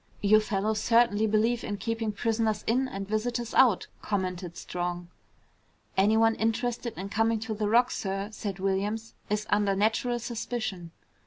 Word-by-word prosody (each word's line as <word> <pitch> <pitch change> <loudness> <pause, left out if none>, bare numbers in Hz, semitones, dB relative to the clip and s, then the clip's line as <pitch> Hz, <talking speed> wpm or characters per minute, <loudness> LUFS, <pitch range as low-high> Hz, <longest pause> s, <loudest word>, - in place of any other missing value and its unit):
"You 210 +1 +6
fellows 215 0 -1
certainly 230 -2 +3
believe 225 +3 +1
in 205 - -3
keeping 225 +1 -2
prisoners 220 0 0
in 255 +4 +2
and 195 -6 -6
visitors 230 +2 -2
out!" 240 -8 +5 0.2
commented 185 -3 -3
Strong. 175 0 -4 0.9
"Anyone 220 +3 +4
interested 235 +1 -1
in 195 +2 -5
coming 225 +2 +1
to 225 -1 -3
the 210 -1 -1
Rock, 240 +3 +4
sir," 195 +1 -3
said 205 -3 -5
Williams, 200 +4 -2 0.2
"is 210 0 -1
under 205 -1 +3
natural 225 +4 +1
suspicion." 225 -6 -4
215 Hz, 145 wpm, -28 LUFS, 200-230 Hz, 0.9 s, You